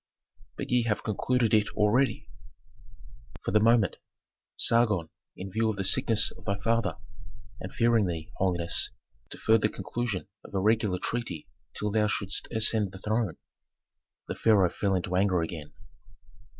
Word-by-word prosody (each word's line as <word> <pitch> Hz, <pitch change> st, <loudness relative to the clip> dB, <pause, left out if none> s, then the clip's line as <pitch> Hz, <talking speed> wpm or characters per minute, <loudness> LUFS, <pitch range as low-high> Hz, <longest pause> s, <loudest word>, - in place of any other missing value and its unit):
"But -, -, -5 dB
ye 125 Hz, 0 st, +4 dB
have 105 Hz, -2 st, -1 dB
concluded 115 Hz, +2 st, 0 dB
it 105 Hz, -1 st, +4 dB
already!" 110 Hz, +2 st, +2 dB, 1.2 s
"For -, -, -1 dB
the 105 Hz, -, +5 dB
moment. 110 Hz, -3 st, +3 dB, 0.6 s
Sargon, 105 Hz, -8 st, +2 dB, 0.3 s
in 95 Hz, +1 st, -7 dB
view 110 Hz, +2 st, +1 dB
of 110 Hz, -, -1 dB
the 95 Hz, -, -1 dB
sickness 115 Hz, +1 st, +1 dB
of -, -, -16 dB
thy 100 Hz, -1 st, -1 dB
father, 115 Hz, 0 st, 0 dB, 0.6 s
and -, -, -7 dB
fearing 115 Hz, -4 st, +3 dB
thee, 80 Hz, -2 st, -5 dB
holiness, 85 Hz, -3 st, +1 dB, 0.4 s
deferred 110 Hz, -1 st, +2 dB
the 105 Hz, -, +2 dB
conclusion 100 Hz, -1 st, -4 dB, 0.2 s
of -, -, -11 dB
a -, -, +2 dB
regular 105 Hz, -2 st, +2 dB
treaty 115 Hz, -6 st, -4 dB, 0.3 s
till 105 Hz, 0 st, -2 dB
thou 105 Hz, 0 st, +2 dB
shouldst 100 Hz, -1 st, -3 dB
ascend 110 Hz, -3 st, +1 dB
the -, -, -8 dB
throne." 110 Hz, -2 st, -1 dB, 0.9 s
The -, -, -3 dB
pharaoh 100 Hz, -6 st, +3 dB
fell 100 Hz, -2 st, 0 dB
into 90 Hz, 0 st, -2 dB
anger 90 Hz, -3 st, +2 dB
again. 80 Hz, -2 st, -6 dB
105 Hz, 150 wpm, -28 LUFS, 95-115 Hz, 1.2 s, the